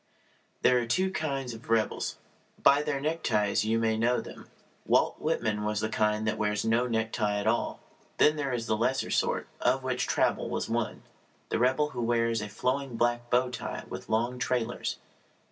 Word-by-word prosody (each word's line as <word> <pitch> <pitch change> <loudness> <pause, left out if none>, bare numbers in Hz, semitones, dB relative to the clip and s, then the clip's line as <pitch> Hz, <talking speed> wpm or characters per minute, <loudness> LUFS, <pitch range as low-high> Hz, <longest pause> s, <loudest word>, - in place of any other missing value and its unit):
There 125 -1 +5
are 120 - -3
two 185 +10 +1
kinds 135 -8 -2
of 115 0 -12
rebels. 115 -1 0 0.5
By 140 +1 +6
their 150 -2 -1
neckties 115 -10 +1
you 110 +1 +2
may 110 -1 +1
know 120 +2 +2
them. - - -10 0.4
Walt - - +2
Whitman 115 -9 0
was 105 0 -1
of 110 - -1
the - - -3
kind 105 0 +1
that 110 - -1
wears 105 0 0
no 115 +3 +2
necktie 110 -2 0
at 100 - -2
all. 115 +2 0 0.4
Then 150 - +5
there 140 -3 -2
is 120 -2 -2
the 110 - +1
lesser 125 +4 0
sort, - - 0
of 130 +2 +2
which 130 -1 -1
Traubel - - +1
was - - -2
one - - -2 0.5
the - - 0
rebel 130 +5 +2
who 120 - -4
wears 115 -1 +1
a 105 - -5
flowing 130 +3 -2
black 120 0 0
bow 125 +1 +2
tie 125 - -5
with - - -7
long 120 +3 0
trailers. 120 0 -1
120 Hz, 185 wpm, -29 LUFS, 110-130 Hz, 0.5 s, By